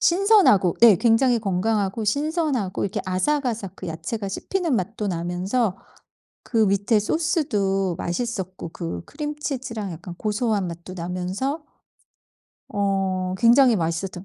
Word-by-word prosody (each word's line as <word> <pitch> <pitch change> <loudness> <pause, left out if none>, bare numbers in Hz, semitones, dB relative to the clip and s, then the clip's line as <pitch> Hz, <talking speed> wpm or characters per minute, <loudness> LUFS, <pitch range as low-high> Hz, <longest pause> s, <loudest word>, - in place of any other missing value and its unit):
신선하고 360 - +4
예 225 -5 +9
굉장히 235 +4 +3
건강하고 205 +1 -1
신선하고 285 - 0
이렇게 195 - -2
아삭아삭 220 0 -1
그 - - -8
야채가 165 +6 -4
씹히는 335 - -1
맛도 210 +2 -3
나면서 185 +4 -1 0.6
그 240 - -6
밑에 200 +3 +2
소스도 205 - 0
맛있었고 185 -2 -4
그 85 +1 -5
크림치즈랑 265 - -4
약간 175 +2 -8
고소한 210 0 -1
맛도 170 +2 -8
나면서 185 - -3 1.1
어 195 -2 -1
굉장히 240 +2 +6
맛있었던 175 +2 -3
205 Hz, 290 characters per minute, -23 LUFS, 185-250 Hz, 1.1 s, 예